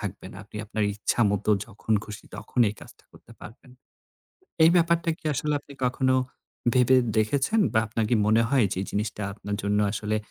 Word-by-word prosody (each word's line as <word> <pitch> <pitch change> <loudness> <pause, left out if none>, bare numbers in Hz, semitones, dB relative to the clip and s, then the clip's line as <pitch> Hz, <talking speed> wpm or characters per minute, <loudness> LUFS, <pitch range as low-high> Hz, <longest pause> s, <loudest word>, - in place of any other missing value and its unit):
থাকবে 100 -3 -6
না। - - -11
আপনি 105 - -12
আপনার 110 0 -1
ইচ্ছামত 105 -1 0 0.2
যখন 110 0 -4
খুশি 105 0 -9
তখন 125 - -3
এই 105 - -5
কাজটা - - -15
করতে - - -17
পারবেন। 125 +3 -13 0.9
এই 165 - +7
ব্যাপারটা 170 -1 +2
কি - - -31
আসলে 150 +2 -1
আপনি 140 - -15
কখনো 130 +1 +1 0.6
ভেবে 130 +1 +5 0.2
দেখেছেন 135 - +1
বা 110 - +3
আপনার 110 +1 -1
কি - - +4
মনে 110 +2 +4
হয় 135 -4 +3
যে - - -4
এই - - -5
জিনিসটা 105 0 -3
আপনার 100 0 -5
জন্য 105 +1 +1
আসলে 105 +1 -1
110 Hz, 180 wpm, -26 LUFS, 105-130 Hz, 0.9 s, এই